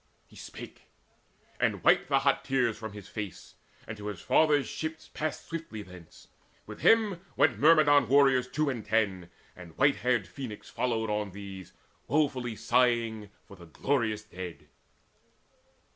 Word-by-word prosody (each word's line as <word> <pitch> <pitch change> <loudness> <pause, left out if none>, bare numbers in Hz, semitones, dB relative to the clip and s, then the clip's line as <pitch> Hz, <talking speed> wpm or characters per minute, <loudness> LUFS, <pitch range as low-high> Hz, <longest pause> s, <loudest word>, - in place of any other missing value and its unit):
He - - -21
spake, - - -11 0.7
and - - 0
wiped - - +4
the - - +4
hot - - +2
tears 125 -4 +1
from 110 -1 -8
his 105 -1 -10
face; 105 -4 -7 0.3
And 110 - -6
to 105 0 -7
his 105 -4 -5
father's 150 - +3
ships 160 +7 -6
passed 155 -1 -4
swiftly 160 -11 -6
thence: 90 -3 -15 0.4
With - - -10
him 215 -6 +4 0.2
went 110 - +3
Myrmidon 145 -3 +5
warriors 135 -2 +4
two 150 +4 -1
and 120 -4 -5
ten, 100 -5 0 0.3
And 85 -3 -13
white 140 +1 +4
haired 120 -5 +1
Phoenix 115 +1 -8
followed 115 -3 -1
on 105 0 -1
with 95 - -14
these 95 -3 -9 0.3
Woefully 130 -4 0
sighing 115 -2 +1 0.2
for 100 - -14
the 85 -2 -14
glorious 110 - -1
dead. 90 -4 -9
115 Hz, 150 wpm, -29 LUFS, 105-140 Hz, 0.7 s, Myrmidon